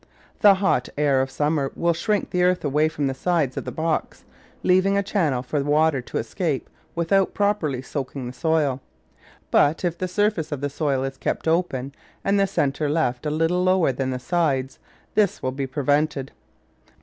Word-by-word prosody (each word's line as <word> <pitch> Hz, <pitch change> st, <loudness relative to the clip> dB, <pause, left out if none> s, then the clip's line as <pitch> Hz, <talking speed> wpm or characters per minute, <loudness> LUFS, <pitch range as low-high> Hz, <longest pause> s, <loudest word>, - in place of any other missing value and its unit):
The 205 Hz, -2 st, +7 dB
hot 185 Hz, -10 st, +1 dB
air 140 Hz, -3 st, +3 dB
of 135 Hz, -, -2 dB
summer 145 Hz, 0 st, 0 dB
will 170 Hz, 0 st, +1 dB
shrink 205 Hz, +5 st, -1 dB
the 180 Hz, -, +1 dB
earth 180 Hz, -2 st, +2 dB
away 150 Hz, +2 st, +2 dB
from 150 Hz, -2 st, -2 dB
the 135 Hz, -, 0 dB
sides 150 Hz, -2 st, 0 dB
of -, -, -4 dB
the -, -, -4 dB
box, 160 Hz, 0 st, -2 dB, 0.4 s
leaving 185 Hz, +2 st, +3 dB
a 200 Hz, -, +1 dB
channel 160 Hz, -, 0 dB
for 145 Hz, +3 st, -2 dB
the 140 Hz, +1 st, -2 dB
water 150 Hz, -2 st, +3 dB
to -, -, -5 dB
escape 145 Hz, -, -2 dB, 0.3 s
without 180 Hz, +3 st, +1 dB
properly 165 Hz, -11 st, 0 dB
soaking 135 Hz, -1 st, -5 dB
the 125 Hz, -, -6 dB
soil; 145 Hz, -2 st, 0 dB, 0.7 s
but 155 Hz, +5 st, +3 dB
if 170 Hz, -1 st, 0 dB
the 185 Hz, -, -1 dB
surface 180 Hz, -4 st, 0 dB
of 145 Hz, -, -3 dB
the 145 Hz, 0 st, -3 dB
soil 140 Hz, -3 st, 0 dB
is 135 Hz, 0 st, -4 dB
kept -, -, -3 dB
open, 150 Hz, -6 st, 0 dB, 0.3 s
and 200 Hz, 0 st, +3 dB
the 195 Hz, -, +3 dB
centre 145 Hz, -4 st, 0 dB
left 145 Hz, -3 st, 0 dB
a -, -, +1 dB
little 165 Hz, +4 st, +1 dB
lower 185 Hz, -5 st, +3 dB
than 130 Hz, +1 st, -2 dB
the 130 Hz, -, -2 dB
sides, 135 Hz, -3 st, -1 dB, 0.3 s
this 210 Hz, -3 st, +1 dB
will 130 Hz, -, 0 dB
be 135 Hz, +1 st, -3 dB
prevented. 145 Hz, 0 st, 0 dB
150 Hz, 185 wpm, -23 LUFS, 135-180 Hz, 0.7 s, The